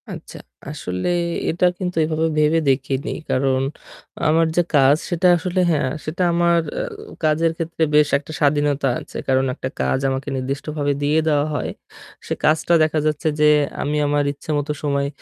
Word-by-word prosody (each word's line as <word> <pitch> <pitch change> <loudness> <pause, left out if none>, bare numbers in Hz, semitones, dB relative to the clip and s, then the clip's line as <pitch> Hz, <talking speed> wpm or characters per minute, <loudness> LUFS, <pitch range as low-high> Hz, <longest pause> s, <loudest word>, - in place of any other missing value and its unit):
আচ্ছা, - - -9 0.3
আসলে 90 -11 -4 0.4
এটা 170 +2 +1
কিন্তু 180 -3 -3
এভাবে 160 +1 0
ভেবে 155 +2 +3
দেখিনি। 135 0 -1 0.2
কারণ 130 0 +1 0.7
আমার 165 +2 +4
যে 175 - +4
কাজ 140 0 +6
সেটা 175 0 +2
আসলে 180 +2 -2
হ্যাঁ, 145 -4 +1 0.2
সেটা 165 +4 -2
আমার 170 0 +3 0.5
উ - - -11
কাজের 160 +2 +2
ক্ষেত্রে 165 -1 -2
বেশ 150 -1 +5
একটা 145 +2 -10
স্বাধীনতা 145 -1 +2
আছে। - - -10
কারণ 130 0 +2
একটা - - -4
কাজ 65 - +1
আমাকে 135 +1 -3
নির্দিষ্টভাবে 145 +2 -2
দিয়ে 150 +2 +2
দেওয়া 145 -2 +2
হয়। - - -2 0.6
সে - - -1
কাজটা 160 +2 +2
দেখা 155 0 +1
যাচ্ছে 155 +1 0
যে 150 - +5 0.3
আমি 150 +1 -1
আমার 145 0 +1
ইচ্ছেমতো 145 0 -3
সময় 140 -1 0
150 Hz, 160 wpm, -21 LUFS, 140-160 Hz, 0.7 s, কাজ